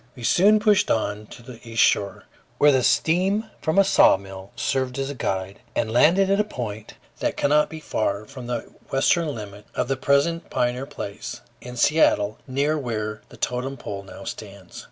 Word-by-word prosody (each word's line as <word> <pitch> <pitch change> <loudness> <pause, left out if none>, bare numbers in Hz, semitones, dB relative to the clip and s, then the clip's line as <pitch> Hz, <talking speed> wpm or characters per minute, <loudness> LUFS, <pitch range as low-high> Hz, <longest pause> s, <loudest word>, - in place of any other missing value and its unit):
We 125 - -10
soon 205 - +5
pushed 210 -2 +3
on 105 -1 -1
to 120 - -13
the 120 -1 -11
east 115 -1 +2
shore, 100 -1 +1 0.3
where 145 0 +6
the 130 -2 +3
steam 185 - +2
from 160 +3 -1
a 195 - +7
sawmill 95 - +2
served 130 -1 -1
as 135 +1 -2
a - - -5
guide, 95 -5 -3 0.2
and 110 - 0
landed 175 +10 +5
at 200 - +3
a - - +4
point 110 - -7 0.2
that - - -1
cannot 150 +1 +3
be 160 - -8
far 105 -7 -2
from 130 -2 -10
the 120 -2 -2 0.3
western 150 +3 +1
limit 105 -2 -9
of - - 0
the 135 - 0
present 140 +6 +1
Pioneer 125 +2 -1
Place, 100 -5 -7 0.2
in 125 0 -9
Seattle, 110 -8 +3
near 145 +4 0
where 110 -4 -4
the - - -14
totem 130 +3 -3
pole 100 -4 -6
now 100 - -11
stands. - - -9
125 Hz, 180 wpm, -23 LUFS, 110-155 Hz, 0.3 s, a